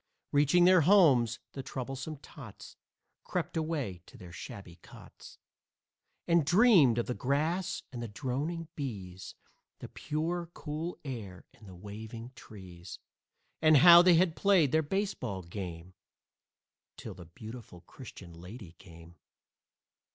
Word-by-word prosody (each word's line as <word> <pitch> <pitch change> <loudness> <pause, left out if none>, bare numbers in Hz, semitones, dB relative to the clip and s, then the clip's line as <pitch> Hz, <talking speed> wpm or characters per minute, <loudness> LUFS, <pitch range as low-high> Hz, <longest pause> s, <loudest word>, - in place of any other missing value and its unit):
Reaching 145 +5 +4
their 185 -1 +6
homes, 140 - +4
the 135 - -6
troublesome 135 +4 -6
tots 135 - -13 0.5
Crept - - -4
away 150 - -3
to - - -15
their 90 -2 -12
shabby 90 -1 -10
cots - - -15 0.9
And 170 -1 +4
dreamed 175 - +5
of 120 - 0
the 125 - -3
grass 155 +8 -1
and 120 -2 -7
the 120 - -4
droning 135 - -4
bees, 95 -10 -7 0.4
The - - -9
pure, 165 +3 -3
cool 160 +3 -5
air 105 -9 -7
and 105 - -17
the 95 - -11
waving 110 +5 -9
trees, 95 -7 -11 0.6
And 155 -1 +6
how 170 +4 +9
they 180 -1 +5
had 165 -1 +2
played 185 -9 +3
their 160 - +3
baseball 145 - -3
game 85 -1 -8 1.0
Till - - -8
the 90 - -12
Beautiful 110 +1 -11
Christian 90 -3 -12
Lady 90 +3 -11
came. 85 -1 -15
130 Hz, 130 wpm, -30 LUFS, 95-160 Hz, 1.0 s, how